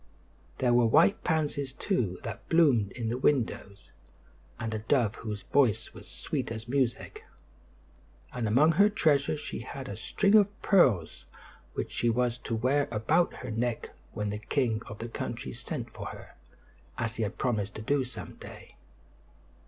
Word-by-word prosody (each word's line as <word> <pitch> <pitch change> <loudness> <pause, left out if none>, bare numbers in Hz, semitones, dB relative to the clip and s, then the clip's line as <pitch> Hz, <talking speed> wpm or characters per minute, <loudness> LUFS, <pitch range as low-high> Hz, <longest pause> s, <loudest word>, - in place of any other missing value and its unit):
There 125 -2 +2
were 120 -1 +5
white 160 - +4
pansies, 145 -5 -1
too, 120 - -1
that - - -7
bloomed 135 - +4
in 115 -3 -3
the 120 +2 -2
windows, 115 -7 -1 0.7
and 110 0 -3
a 110 - -2
dove 115 -1 +1
whose 105 -3 -6
voice 130 -2 +2
was - - -12
sweet - - -4
as 115 0 -6
music; 135 - -1 1.1
and 120 -3 -2
among 140 +9 +5
her 200 +6 +5
treasures 150 -6 +2
she - - -5
had 135 -2 -7
a 100 - -5
string 200 - +1
of 205 -2 +4
pearls 120 - +3 0.5
which - - -3
she 120 - +1
was 120 +1 0
to 115 - -3
wear 135 +5 +1
about 115 +10 +2
her 125 - -7
neck 115 +1 -2 0.2
when 105 -1 -3
the 105 - -4
king 115 -1 0
of 105 - -8
the 115 - -5
country 115 - -5
sent - - -6
for - - -6
her, - - -10 0.6
as 110 -1 -2
he - - -2
had 105 0 -2
promised 110 -5 -1
to 110 - -6
do 140 +3 +1
some 125 -4 -8
day. - - -12
120 Hz, 165 wpm, -29 LUFS, 110-145 Hz, 1.1 s, were